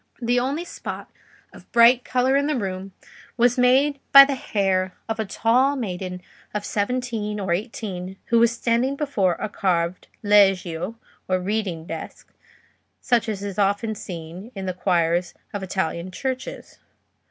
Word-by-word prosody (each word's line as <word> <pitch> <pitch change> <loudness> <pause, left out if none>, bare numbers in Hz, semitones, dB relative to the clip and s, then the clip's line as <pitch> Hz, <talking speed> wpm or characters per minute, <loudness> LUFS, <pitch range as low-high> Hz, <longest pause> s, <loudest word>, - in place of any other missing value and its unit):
The 245 0 +1
only 280 +7 -2
spot - - -7 0.4
of - - -16
bright 240 +1 +6
colour 255 +1 +1
in 285 +1 +2
the 300 - 0
room 190 -2 -4 0.5
was 245 +1 +3
made 270 +3 +4
by 275 0 +11
the 280 - -1
hair 190 -7 0
of 225 0 -3
a 220 - 0
tall 250 +7 +2
maiden 180 -6 -5 0.3
of 205 -1 -2
seventeen 215 -1 -2
or 190 -3 0
eighteen, 190 -2 -5
who 235 - +4
was 230 0 +5
standing 240 +3 0
before 250 - +1
a 215 - -4
carved 180 -4 -1 0.2
leggio, 195 -2 +3 0.3
or 185 0 +1
reading 185 -4 -2
desk, 165 -1 -8 0.7
such 235 -2 +1
as 200 -2 -4
is 200 0 -5
often 205 +2 +1
seen 180 +2 -8
in 195 -1 -5
the 185 - -2
choirs 175 -1 0 0.2
of 205 - -3
Italian 185 -2 -2
churches. 260 +6 -5
210 Hz, 150 wpm, -23 LUFS, 185-245 Hz, 0.7 s, by